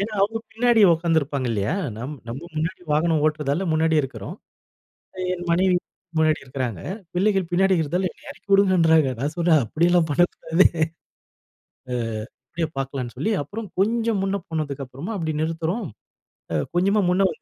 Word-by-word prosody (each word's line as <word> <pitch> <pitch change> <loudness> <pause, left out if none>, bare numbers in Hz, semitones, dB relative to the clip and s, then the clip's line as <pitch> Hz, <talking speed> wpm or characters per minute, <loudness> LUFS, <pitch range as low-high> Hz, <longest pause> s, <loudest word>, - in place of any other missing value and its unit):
ஏன்னா 210 +2 -2
அவங்க 215 +3 +2
பின்னாடி 235 0 +3
உட்கார்ந்திருப்பாங்க 160 -5 0
இல்லையா? 110 - 0 0.2
நம் 125 +6 -5 0.2
நம்ப 130 +7 -5
முன்னாடி 160 +4 -2
வாகனம் 155 +1 +2
ஓட்டுறதால 150 +3 0
முன்னாடி 160 +1 +2
இருக்கிறோம். 120 -7 -6 0.8
அ - - -14 0.2
என் 175 -1 -5
மனைவி 180 +2 +3 0.4
முன்னாடி 155 -1 +3
இருக்கிறாங்க. 130 -8 -4 0.3
பிள்ளைகள் 195 -1 +2
பின்னாடி 190 +2 +3
இருக்கிறதால, 175 +3 0
என்னை - - -21
இறக்கிவுடுங்கன்றாங்க. 180 -7 +3
நான் 145 +4 -2
சொல்றேன், 170 -3 +4
அப்படியெல்லாம் 170 +6 +2
பண்ணக்கூடாது. 175 +3 +3 1.2
அ - - -2 0.5
அப்படியே 165 -2 -3
பார்க்கலாம்ன்னு 135 -3 -4
சொல்லி 155 - 0
அப்புறம் 210 +8 -7
கொஞ்சம் 225 0 +1
முன்ன 195 +1 -1
போனதுக்குப்புறமா 145 - -4
அப்படி 160 -4 -2
நிறுத்துறோம். 165 +6 -2 0.7
அ - - +1 0.2
கொஞ்சமா 200 +4 +3
முன்ன 180 +2 +2
வந் 165 - -8
165 Hz, 140 wpm, -23 LUFS, 145-190 Hz, 1.2 s, சொல்றேன்